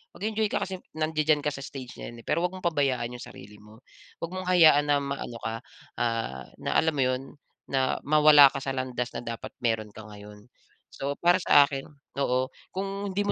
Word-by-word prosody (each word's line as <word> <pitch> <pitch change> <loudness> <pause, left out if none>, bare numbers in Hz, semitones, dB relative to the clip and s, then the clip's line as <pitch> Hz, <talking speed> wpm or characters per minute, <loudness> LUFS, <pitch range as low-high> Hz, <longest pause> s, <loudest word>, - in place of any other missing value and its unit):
Mag-enjoy 215 +3 -1
ka - - 0
kasi 190 - -4 0.2
nandadyan 155 -1 +1
ka 150 - 0
sa 135 - -8
stage 130 -3 -8
na - - -7
yan, 120 - -12
eh. - - -38
Pero 170 +3 +1
huwag 180 - 0
mong 185 -2 -2
pabayaan 130 -6 0
'yung 120 - -8
sarili 105 +2 -12
mo. 105 +2 -16 0.4
Huwag 170 +1 -5
mong 185 -1 -5
hayaan 155 -5 +6
na 145 - +4
ma 140 0 -3
ano 120 - -6
ka, 110 0 -3 0.4
ah, 115 - -2
na, - - -3
alam 160 -1 +3
mo 135 - +2
'yon, 130 0 0 0.5
na 130 -1 +1
mawala 150 -2 +7
ka - - -4
sa 135 0 -4
landas 125 -2 -3
na - - -4
dapat 115 -1 -6
mayro'n 110 -2 0
ka 110 - -9
ngayon. 105 0 -13 0.4
So, 140 +1 -4
para 175 +1 +5
sa 145 - +6
akin, 140 -1 -4 0.3
oo, 130 -1 0 0.2
kung 195 +1 -3
hindi 205 +2 0
mo 205 - 0
140 Hz, 210 wpm, -27 LUFS, 120-160 Hz, 0.5 s, mawala